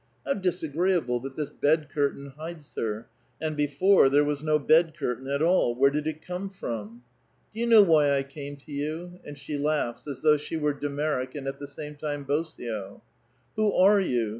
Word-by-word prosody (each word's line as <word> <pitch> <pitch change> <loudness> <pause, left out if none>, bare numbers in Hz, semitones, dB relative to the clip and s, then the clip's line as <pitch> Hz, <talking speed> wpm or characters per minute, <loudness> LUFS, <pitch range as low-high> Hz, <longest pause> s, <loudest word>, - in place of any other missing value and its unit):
How 275 - +1
disagreeable, 175 - 0
that 135 +2 -8
this 150 -2 -3
bed 150 +1 +1
curtain 140 -2 -1
hides 155 -1 -9
her 110 0 -3 0.2
— 125 -1 -40
and 155 0 -2
before 150 +3 +4
there 145 +2 +4
was 145 -1 -1
no 155 0 +2
bed 160 +2 +3
curtain 130 -2 -3
at 140 +2 0
all: 165 -8 +3
where 140 +2 +4
did 150 +1 -2
it 155 0 -5
come 180 +2 -4
from? 115 - -6 0.2
" 115 - -40
Do 225 +2 -2
vou - - -1
know 220 -3 +8
whv 155 -4 +4
I 140 -1 +2
came 140 +1 -8
to 140 - -23
vou?" 155 +5 -5
And 145 -1 -9
she 145 +1 -5
lauorhs, 145 -4 -1
as 140 -3 -6
though 150 -1 +5
she 150 +2 -5
were 150 -1 +1
de 145 +1 -4
Merrick 140 -3 -2
and 140 -2 -5
at 135 - -4
the 145 - -7
same 150 +1 -8
time 145 -1 -4
Bosio. 120 -9 -3 0.2
* 120 - -40
' - - -40
Who 215 -1 +3
are 200 +2 +6
you 120 - 0
145 Hz, 215 wpm, -27 LUFS, 140-160 Hz, 0.2 s, know